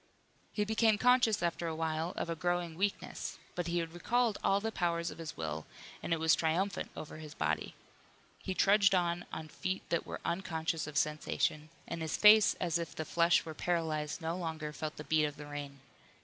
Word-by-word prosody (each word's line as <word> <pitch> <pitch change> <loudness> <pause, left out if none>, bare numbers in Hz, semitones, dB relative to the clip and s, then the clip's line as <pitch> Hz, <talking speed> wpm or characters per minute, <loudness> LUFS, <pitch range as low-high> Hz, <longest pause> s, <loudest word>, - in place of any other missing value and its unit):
He 210 - 0
became 220 0 +3
conscious 245 -4 +4
after 170 0 -1
a 160 - -2
while 160 +1 -1
of - - -1
a 165 - -2
growing 175 0 -1
weakness, 195 +4 -2 0.2
but 175 -1 -3
he 175 +1 0
had 165 -1 -2
recalled 230 +5 +1
all 195 - +3
the 225 +2 -2
powers 170 -3 0
of - - -11
his 160 -1 -6
will 80 -1 -4 0.3
and - - -5
it 165 - +2
was 160 0 +4
triumphant 175 +5 0
over 155 - -7
his 155 -1 -9
body. 75 +1 -1 0.7
He 190 - -3
trudged 200 +1 +5
on 175 -1 0
on 160 - -5
feet 185 +4 -4
that 170 - 0
were - - -5
unconscious 165 -3 -1
of 150 -1 -4
sensation, 150 +1 0 0.2
and 170 -1 -4
his 160 -1 -1
face 215 0 +7
as 170 -2 0
if 165 -4 -5
the 160 - -3
flesh 170 +2 +3
were 160 - -5
paralyzed 160 -1 -1
no 165 +1 -1
longer 160 -4 -4
felt 155 0 -4
the 150 - -6
beat 155 0 +3
of 145 -1 -3
the 150 - -8
rain. 145 -2 -7
170 Hz, 200 wpm, -33 LUFS, 155-185 Hz, 0.7 s, face